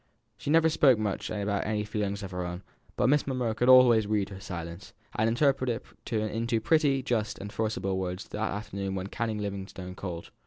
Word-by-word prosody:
She 105 Hz, -, -6 dB
never 160 Hz, +1 st, +5 dB
spoke 145 Hz, -6 st, +5 dB
much 105 Hz, -2 st, -2 dB
about 100 Hz, -1 st, -1 dB
any 105 Hz, -1 st, -1 dB
feelings 105 Hz, -1 st, -3 dB
of 95 Hz, -, -6 dB
her 90 Hz, 0 st, -3 dB
own, 90 Hz, +1 st, -5 dB, 0.3 s
but -, -, +2 dB
Miss 145 Hz, +2 st, +3 dB
Monro 125 Hz, -4 st, 0 dB
could 125 Hz, +3 st, +1 dB
always 120 Hz, -4 st, +7 dB
read 105 Hz, -2 st, 0 dB
her 95 Hz, -2 st, -8 dB
silence, 85 Hz, -1 st, -7 dB, 0.2 s
and 110 Hz, +1 st, +2 dB
interpreted 130 Hz, -1 st, +1 dB, 0.3 s
it -, -, -14 dB
into 115 Hz, +1 st, 0 dB
pretty 140 Hz, 0 st, +2 dB
just 115 Hz, -5 st, -1 dB
and 100 Hz, +1 st, -7 dB
forcible 100 Hz, -4 st, -1 dB
words 90 Hz, +1 st, -4 dB
that 110 Hz, +1 st, -2 dB
afternoon 100 Hz, -2 st, -4 dB
when 95 Hz, 0 st, -3 dB
Canon 115 Hz, -1 st, -2 dB
Livingstone 95 Hz, -2 st, -5 dB
called. 90 Hz, -3 st, -6 dB
105 Hz, 190 wpm, -29 LUFS, 95-120 Hz, 0.3 s, always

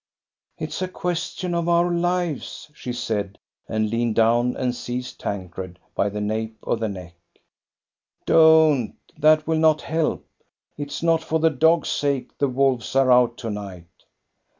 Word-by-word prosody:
"It's -, -, -5 dB
a 185 Hz, -, 0 dB
question 180 Hz, 0 st, -3 dB
of 170 Hz, 0 st, 0 dB
our 170 Hz, +1 st, +3 dB
lives," 175 Hz, -4 st, -2 dB
she 125 Hz, -, -6 dB
said, 105 Hz, -5 st, -3 dB, 0.3 s
and 110 Hz, -1 st, -1 dB
leaned 115 Hz, -1 st, 0 dB
down 120 Hz, +2 st, +2 dB
and 125 Hz, -1 st, -1 dB
seized 125 Hz, 0 st, -6 dB
Tancred 90 Hz, -2 st, -5 dB, 0.2 s
by 100 Hz, -, 0 dB
the 105 Hz, +1 st, -5 dB
nape 110 Hz, +1 st, -3 dB
of 115 Hz, -, -1 dB
the 110 Hz, -1 st, -1 dB
neck. 90 Hz, -3 st, -8 dB, 1.1 s
"Don't, 160 Hz, -6 st, +5 dB
— -, -, -30 dB
that 155 Hz, 0 st, +5 dB
will 160 Hz, 0 st, 0 dB
not 155 Hz, -1 st, +3 dB
help! 160 Hz, -1 st, -1 dB, 0.5 s
It 145 Hz, -1 st, -5 dB
is 145 Hz, +3 st, -6 dB
not 165 Hz, -1 st, +3 dB
for 160 Hz, 0 st, 0 dB
the 160 Hz, 0 st, +3 dB
dog's 160 Hz, +4 st, +3 dB
sake 140 Hz, -3 st, -1 dB
the 140 Hz, -, +2 dB
wolves 130 Hz, -2 st, 0 dB
are 135 Hz, -1 st, +4 dB
out 125 Hz, -1 st, +4 dB
to 115 Hz, -3 st, -5 dB
night." 95 Hz, -5 st, -8 dB
130 Hz, 160 wpm, -23 LUFS, 110-160 Hz, 1.1 s, Don't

